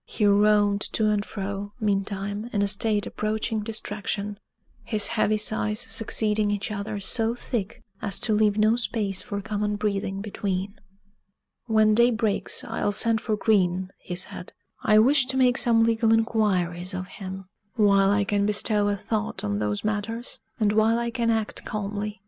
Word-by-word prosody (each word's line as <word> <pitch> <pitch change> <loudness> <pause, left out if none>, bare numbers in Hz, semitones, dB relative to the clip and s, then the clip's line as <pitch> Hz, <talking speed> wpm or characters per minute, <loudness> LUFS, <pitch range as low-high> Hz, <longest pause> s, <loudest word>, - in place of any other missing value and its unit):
He 215 - -1
roamed 205 0 +4
to 215 -1 +2
and 205 -1 0
fro, 200 0 -5
meantime, 205 +1 -2
in 205 -2 +1
a - - +1
state 210 +1 +1
approaching 215 +1 -2
distraction, 210 -1 -4 0.4
his 215 -3 0
heavy 215 +1 +1
sighs 215 0 0
succeeding 215 -1 +1
each 205 +1 -2
other 205 0 -4
so 225 +4 0
thick 230 -3 -4 0.2
as 200 -2 0
to 220 - +2
leave 210 -1 +2
no 215 +1 +4
space 210 -5 +1
for 200 +1 -5
common 210 0 -2
breathing 200 -2 -2
between. 195 -1 -3 0.9
"When 215 -1 +4
day 235 +2 +5
breaks, 220 -3 -1
I'll - - -2
send 225 +2 +2
for 215 -2 -1
Green," 185 -3 +1
he 180 - -6
said; 180 0 -5 0.3
"I 215 0 +4
wish 260 +4 +5
to 265 0 -2
make 250 -2 +4
some 230 -1 +4
legal 225 0 +2
inquiries 190 -6 +1
of 185 0 -4
him, 190 0 -8 0.3
while 200 -3 +4
I 205 0 +2
can 200 0 0
bestow 210 0 +1
a 205 0 0
thought 215 +1 -3
on 100 0 -1
those 105 -1 -2
matters, 215 +3 -3 0.2
and 210 -2 +2
while 220 +1 +3
I 235 0 -2
can 235 -1 -1
act 220 -2 -1
calmly. 210 0 -4
210 Hz, 165 wpm, -25 LUFS, 200-220 Hz, 0.9 s, day